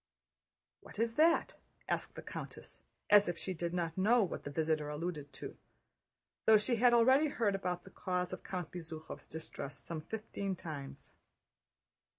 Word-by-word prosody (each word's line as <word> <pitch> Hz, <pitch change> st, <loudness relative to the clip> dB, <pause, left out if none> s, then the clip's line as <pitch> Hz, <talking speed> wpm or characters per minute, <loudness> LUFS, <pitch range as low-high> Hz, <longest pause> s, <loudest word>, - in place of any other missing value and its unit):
"What -, -, -14 dB
is 230 Hz, +1 st, +1 dB
that?" 330 Hz, +2 st, +4 dB, 0.3 s
asked -, -, -1 dB
the -, -, -7 dB
countess -, -, -8 dB, 0.3 s
as 205 Hz, -2 st, +8 dB
if 175 Hz, -, -2 dB
she 190 Hz, -, -3 dB
did 170 Hz, 0 st, -3 dB
not 170 Hz, 0 st, -2 dB
know 225 Hz, +4 st, +5 dB
what 185 Hz, -, -4 dB
the -, -, -3 dB
visitor 155 Hz, 0 st, 0 dB
alluded 150 Hz, -1 st, -4 dB
to, -, -, -7 dB, 0.9 s
though 220 Hz, -1 st, +9 dB
she 235 Hz, +3 st, +1 dB
had 245 Hz, +2 st, +6 dB
already 260 Hz, +6 st, +6 dB
heard 230 Hz, -8 st, +1 dB
about 180 Hz, -2 st, -2 dB
the 195 Hz, -, -13 dB
cause 180 Hz, 0 st, -2 dB
of 185 Hz, -, -5 dB
Count 180 Hz, -4 st, -4 dB
Bezúkhov's 160 Hz, -2 st, -8 dB
distress 155 Hz, -3 st, -6 dB
some 165 Hz, -2 st, -4 dB
fifteen 200 Hz, 0 st, -4 dB
times. 150 Hz, -5 st, -8 dB
180 Hz, 160 wpm, -34 LUFS, 160-220 Hz, 0.9 s, though